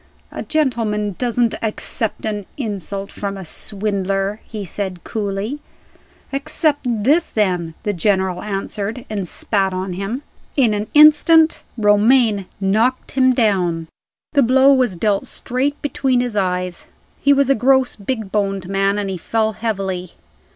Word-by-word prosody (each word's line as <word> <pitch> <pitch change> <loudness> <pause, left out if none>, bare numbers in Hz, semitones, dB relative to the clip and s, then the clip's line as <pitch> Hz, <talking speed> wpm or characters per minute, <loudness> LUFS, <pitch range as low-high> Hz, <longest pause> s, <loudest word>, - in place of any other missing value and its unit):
"A - - -5
gentleman 225 -9 0
doesn't 240 -2 +1
accept 220 0 -2
an 210 -3 -3
insult 200 - -4
from 200 -1 -4
a 190 - -8
swindler," 195 +2 -2
he 210 -3 -6
said, 185 -1 -4
coolly. 210 +5 -3 0.7
"Accept 290 0 0 0.2
this, 310 +8 +3
then!" 180 -6 -1
the 210 -2 -1
General 190 -1 0
answered 210 +3 -4
and 200 -4 -3
spat 195 +1 -1
on 185 0 -3
him. 200 +9 -4 0.3
In 240 -6 +4
an 210 +1 -2
instant 315 +2 +6 0.2
Romayne 210 -1 +3
knocked 220 +6 +1
him 260 -1 +4
down. 180 -9 +1 0.4
The 285 - +4
blow 265 +2 +5
was 255 -8 +2
dealt 200 +3 0
straight 270 +4 -2
between 265 -3 +1
his 245 -3 -2
eyes: 180 -2 -2 0.3
he 280 - +4
was 280 -1 +4
a - - +7
gross 265 +1 +2
big 215 -1 -4
boned 195 -3 -1
man, 195 +1 +1
and 205 -1 -2
he 190 -2 -4
fell 220 +4 0
heavily. 195 -5 -3
210 Hz, 140 wpm, -19 LUFS, 195-255 Hz, 0.7 s, a